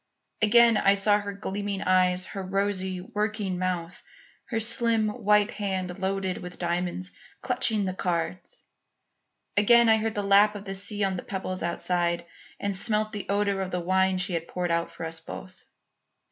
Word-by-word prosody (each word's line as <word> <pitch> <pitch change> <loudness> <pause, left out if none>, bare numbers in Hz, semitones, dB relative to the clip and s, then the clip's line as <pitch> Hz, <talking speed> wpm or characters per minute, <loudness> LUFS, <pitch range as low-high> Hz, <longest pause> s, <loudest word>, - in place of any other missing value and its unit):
Again 230 +1 +6
I 195 0 +4
saw 205 +1 +4
her 205 -1 -5
gleaming 200 0 -4
eyes, 185 0 +2
her 195 - -6
rosy, 190 -1 -1
working 210 -3 -2
mouth, 175 -2 -3 0.4
her 230 -3 -2
slim, 230 -1 +1
white 210 -2 +2
hand, 190 -3 -3
loaded 190 -1 -1
with 180 -1 -9
diamonds, 180 +1 -2 0.3
clutching 215 -3 +1
the 185 - -2
cards. 175 -1 -3 0.9
Again 235 +3 +6
I 220 - +6
heard 220 0 -2
the 205 - -1
lap 200 +1 +5
of 205 0 -8
the 195 - -4
sea 205 +1 +1
on 190 -1 0
the - - -6
pebbles 185 -1 -4
outside 170 0 -1 0.3
and 200 -1 -2
smelt 215 +2 0
the 205 -3 -6
odour 200 -1 +1
of 190 - -3
the 180 - -2
wine 190 +1 +2
she 185 0 -1
had 165 0 -2
poured 180 -1 -2
out 170 0 0
for 165 - -7
us 160 0 -4
both. 185 +3 -10
195 Hz, 170 wpm, -26 LUFS, 180-210 Hz, 0.9 s, Again